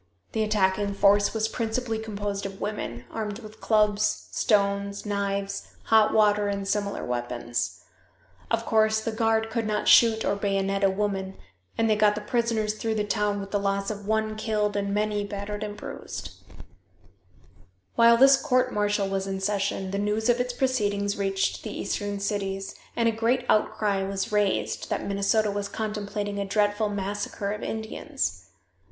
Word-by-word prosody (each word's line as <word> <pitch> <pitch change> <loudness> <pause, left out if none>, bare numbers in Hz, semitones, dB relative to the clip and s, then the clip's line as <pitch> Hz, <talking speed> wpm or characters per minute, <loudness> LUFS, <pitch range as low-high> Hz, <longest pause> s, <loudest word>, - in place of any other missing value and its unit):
The 220 - -1
attacking 200 -1 +1
force 205 +1 +4
was 220 -1 0
principally 225 0 -2
composed 205 -2 -3
of 195 0 -10
women, 125 - -4
armed 210 -2 -3
with 215 -2 -12
clubs, 210 -1 +2
stones, 200 -1 +1
knives, 200 -1 -3
hot 220 -1 +4
water 210 -1 +3
and 200 -1 -2
similar 200 0 -1
weapons. 120 -1 -3 0.7
Of 230 0 0
course, 220 -1 +3
the 225 +1 -3
guard 225 0 +1
could 225 -1 -1
not 210 0 -1
shoot 225 -2 +6
or - - +1
bayonet 195 0 0
a 195 - +6
woman, 195 -1 -2 0.4
and 225 - +2
they 215 - +3
got 210 0 +4
the 210 - -4
prisoners 220 -1 0
through 220 +1 -2
the 210 - +1
town 210 -1 0
with 195 0 -7
the 205 - +1
loss 195 +1 -1
of 205 -1 -7
one 220 0 0
killed 215 -1 -1
and 200 0 -1
many 210 0 0
battered 205 +1 -5
and 210 -1 -5
bruised. - - -7 1.6
While 235 0 +6
this 270 +2 +7
court 255 -3 +2
martial 205 -1 +1
was 195 0 -2
in 195 0 -3
session 195 -1 -1
the 200 - -1
news 210 +3 0
of 240 0 +4
its 245 0 0
proceedings 205 -6 0
reached 195 -1 -1
the 215 - -6
eastern 205 0 -2
cities, 195 -1 -2 0.2
and 230 -1 +2
a - - +4
great 235 +3 0
outcry 210 -2 +2
was 195 +1 -2
raised, 205 -2 0
that - - -2
Minnesota 200 +2 +1
was 200 0 -3
contemplating 205 -1 -3
a - - 0
dreadful 205 +1 +1
massacre 205 0 -3
of 210 - -4
Indians. 220 0 -3
205 Hz, 165 wpm, -26 LUFS, 200-220 Hz, 1.6 s, this